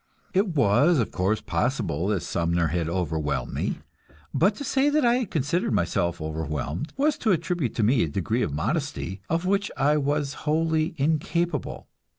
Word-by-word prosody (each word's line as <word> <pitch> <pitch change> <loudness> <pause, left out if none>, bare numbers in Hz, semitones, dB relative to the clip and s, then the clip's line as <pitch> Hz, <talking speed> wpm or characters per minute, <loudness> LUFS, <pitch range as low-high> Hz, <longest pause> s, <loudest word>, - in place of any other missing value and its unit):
It 190 -3 +1
was, 140 +7 +4
of 115 - 0
course, 95 +4 0
possible 95 - -1
that 100 -4 0
Sumner 85 -1 0
had 85 +1 -1
overwhelmed 80 -7 -2
me, - - -2 0.5
but 190 +9 +3
to 285 - -6
say 275 +1 +2
that 295 -2 +2
I 240 +1 +4
had 250 -5 -2
considered 155 -1 0
myself 85 -2 0
overwhelmed 80 - -3
was 295 +2 +2
to 220 - +2
attribute 170 -6 -1
to 115 - +1
me 115 +3 +4
a - - +2
degree 100 +10 -1
of - - 0
modesty 85 +5 -2
of 165 +2 0
which 200 +1 +1
I 150 +2 +3
was 145 -1 0 0.2
wholly 160 +1 +1
incapable. 160 +4 -1
135 Hz, 165 wpm, -25 LUFS, -, 0.5 s, was